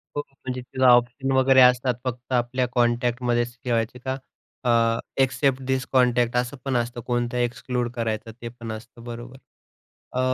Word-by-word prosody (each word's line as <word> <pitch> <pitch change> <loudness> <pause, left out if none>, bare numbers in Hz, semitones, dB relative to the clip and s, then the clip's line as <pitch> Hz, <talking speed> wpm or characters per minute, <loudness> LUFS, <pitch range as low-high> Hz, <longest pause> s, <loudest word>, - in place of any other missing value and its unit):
हो, 145 - 0
म्हणजे 130 -2 -6
किंवा 130 +1 +1
ऑप्शन 120 +3 +2
वगैरे 130 0 +5
असतात, 125 0 +5
फक्त 125 0 -5
आपल्या 125 +1 +1
कॉन्टॅक्टमध्येच 120 0 +1
ठेवायचे 120 0 -1
का? 130 0 -1 0.5
अ, 125 - +2 0.5
इक्सेप्ट 135 0 +1
धिस 130 0 0
कॉन्टॅक्ट 125 -2 +3
असं 125 +3 -1
पण 135 -2 0
असतं, 120 0 -1
कोणतं 120 0 -1
एक्सक्लूड 120 0 -1
करायचं, 115 -1 -2
ते 120 - -5
पण 115 -1 -8
असतं, 115 +2 -10
बरोबर. 120 +2 -8 0.8
अ, 125 - -1
125 Hz, 150 wpm, -24 LUFS, 120-130 Hz, 0.8 s, वगैरे